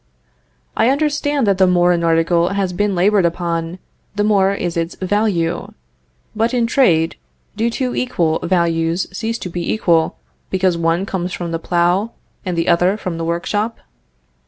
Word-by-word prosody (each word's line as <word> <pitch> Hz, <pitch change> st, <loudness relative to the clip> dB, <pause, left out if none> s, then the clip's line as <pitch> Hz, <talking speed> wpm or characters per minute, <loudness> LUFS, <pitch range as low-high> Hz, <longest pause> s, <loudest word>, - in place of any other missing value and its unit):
"I 225 Hz, -, +3 dB
understand 290 Hz, -1 st, +1 dB
that 195 Hz, -2 st, +1 dB
the 190 Hz, -, +5 dB
more 180 Hz, 0 st, +3 dB
an 170 Hz, -1 st, +1 dB
article 170 Hz, +1 st, +2 dB
has 195 Hz, -2 st, -1 dB
been 205 Hz, +1 st, 0 dB
labored 195 Hz, +2 st, +3 dB
upon, 170 Hz, 0 st, -2 dB, 0.4 s
the 205 Hz, -, +1 dB
more 200 Hz, -2 st, +3 dB
is 175 Hz, -4 st, -3 dB
its 165 Hz, 0 st, -2 dB
value. 185 Hz, -4 st, -1 dB, 0.6 s
But 225 Hz, +3 st, 0 dB
in 240 Hz, -2 st, +2 dB
trade, 175 Hz, -, +2 dB, 0.4 s
do 225 Hz, +2 st, 0 dB
two 250 Hz, +1 st, -2 dB
equal 170 Hz, -11 st, 0 dB
values 170 Hz, 0 st, +1 dB
cease 230 Hz, +2 st, -2 dB
to 180 Hz, -, -6 dB
be 175 Hz, 0 st, -3 dB
equal, 170 Hz, -6 st, +1 dB, 0.3 s
because 185 Hz, -2 st, +1 dB
one 170 Hz, +2 st, 0 dB
comes 180 Hz, -2 st, -3 dB
from 170 Hz, -1 st, -4 dB
the 165 Hz, -, -2 dB
plough, 175 Hz, +6 st, +1 dB, 0.3 s
and 180 Hz, -3 st, -3 dB
the 165 Hz, -, 0 dB
other 175 Hz, +4 st, +3 dB
from 180 Hz, -5 st, -5 dB
the 165 Hz, -, -2 dB
workshop?" 205 Hz, +7 st, -2 dB
180 Hz, 160 wpm, -18 LUFS, 170-210 Hz, 0.6 s, the